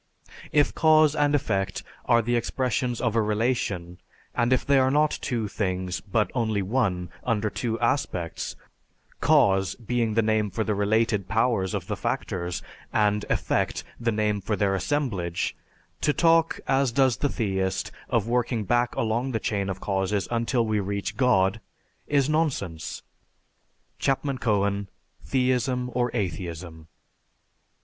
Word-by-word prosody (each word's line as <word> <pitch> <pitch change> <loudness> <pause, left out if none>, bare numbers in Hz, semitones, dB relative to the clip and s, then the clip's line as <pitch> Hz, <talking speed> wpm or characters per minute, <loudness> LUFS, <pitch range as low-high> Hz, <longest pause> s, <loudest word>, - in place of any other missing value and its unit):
If 145 -1 +3
cause 155 -2 +5
and 145 -1 +3
effect 100 -9 -1 0.2
are 115 0 +4
the 120 +2 0
expressions 125 0 -1
of 115 -3 0
a 115 - +4
relation, 105 -5 -1 0.3
and 120 +1 +1
if 130 - +2
they 140 -1 +4
are 130 0 +3
not 150 +2 +2
two 115 -4 -1
things, 95 -3 -2
but 105 +1 0
only 110 -5 0
one, 95 -5 0
under 110 -3 0
two 115 -2 -2
aspects, 90 - -1 0.6
'cause' 95 -1 +3
being 115 -2 -1
the 115 - +3
name 110 -1 +1
for 110 +4 -2
the 105 - 0
related 105 -1 +1
powers 110 -4 +1
of - - -3
the - - -3
factors, 85 -1 -3 0.3
and 105 -1 +2
'effect' - - 0 0.2
the 115 0 0
name 105 -1 0
for 105 +3 -1
their 100 -1 +1
assemblage, 95 - -1 0.5
to 150 - +2
talk, 165 0 +3
as 135 -2 +2
does 130 0 +3
the 145 - 0
theist, 95 -6 -1 0.2
of 115 -2 +1
working 120 -2 0
back 120 +3 +1
along 115 +4 -1
the 115 - 0
chain 100 -3 -1
of 95 0 -4
causes 95 0 -1
until 115 +1 +1
we 110 -1 +1
reach 100 0 -3
God, 110 -5 +2 0.5
is 140 -2 +2
nonsense." 140 - -1 1.0
(_Chapman 135 -1 0
Cohen: 100 -3 +1 0.3
"Theism 125 -1 0
or 125 0 +1
Atheism." 85 -4 -4
110 Hz, 140 wpm, -26 LUFS, 100-125 Hz, 1.0 s, cause